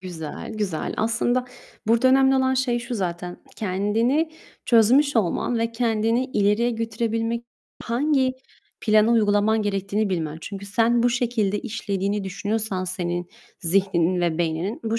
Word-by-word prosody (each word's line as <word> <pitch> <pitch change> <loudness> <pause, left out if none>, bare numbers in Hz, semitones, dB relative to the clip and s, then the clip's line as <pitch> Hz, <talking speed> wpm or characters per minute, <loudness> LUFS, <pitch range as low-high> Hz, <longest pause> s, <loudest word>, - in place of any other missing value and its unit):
Güzel, 165 -5 -7
güzel. 200 -7 -3
Aslında 235 +3 +1 0.4
burada 235 +3 +4
önemli 265 0 +5
olan 260 0 +2
şey 255 -2 +1
şu 240 +1 -5
zaten. 175 -3 -3 0.2
Kendini 220 - 0 0.3
çözmüş 250 +5 +4
olman 225 +3 0
ve 230 0 -1
kendini 230 +1 +1
ileriye 215 -1 +1
götürebilmek 230 0 -2 0.4
hangi 260 +2 +1 0.5
planı 215 0 +4
uygulaman 215 0 +3
gerektiğini 200 +1 -1
bilmen. 160 -4 -2
Çünkü 200 +3 -7
sen 230 +3 +2
bu 245 - +3
şekilde 230 -4 0
işlediğini 205 -3 -2
düşünüyorsan 200 0 -2
senin 175 -1 -3 0.3
zihninin 180 -1 +1
ve 170 -2 0
beyninin, 170 +6 -2
bu 225 +1 0
215 Hz, 130 wpm, -23 LUFS, 195-235 Hz, 0.5 s, önemli